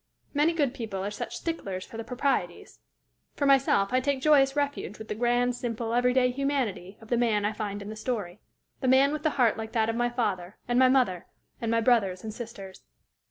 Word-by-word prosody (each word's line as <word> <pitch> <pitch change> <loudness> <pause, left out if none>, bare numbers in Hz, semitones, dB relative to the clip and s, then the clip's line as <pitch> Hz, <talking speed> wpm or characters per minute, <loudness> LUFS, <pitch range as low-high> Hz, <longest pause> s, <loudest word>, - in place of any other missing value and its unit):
Many 305 +3 +3
good 285 -6 0
people 215 -7 -4
are 205 - -3
such 205 - -5
sticklers 195 - -4
for - - -13
the 225 - -4
proprieties! 250 +4 -2 0.6
For 285 - -1
myself, 265 -7 +3
I 255 - +4
take 275 +1 0
joyous 270 -1 +4
refuge 285 -7 -2
with 220 0 -10
the - - -1
grand, 245 +2 +1
simple, 230 -1 -3
every 245 +1 +3
day 250 0 +3
humanity 245 -8 -2
of 220 - -14
the 240 - +2
man 220 -4 +1
I 210 - 0
find 205 -2 -4
in 200 - -8
the - - -7
story 215 -5 -4 0.4
the 260 - -2
man 270 +3 +5
with 305 - -3
the 310 - +2
heart 240 -4 +3
like 220 0 -6
that 225 -2 +2
of 225 - -1
my 240 +1 +1
father 200 -6 -2
and 240 +1 +2
my 260 0 +6
mother 250 -10 +1 0.3
and 230 - -1
my 230 0 +2
brothers 205 -6 +2
and 215 -1 -5
sisters. 210 -5 -9
240 Hz, 215 wpm, -27 LUFS, 210-260 Hz, 0.6 s, my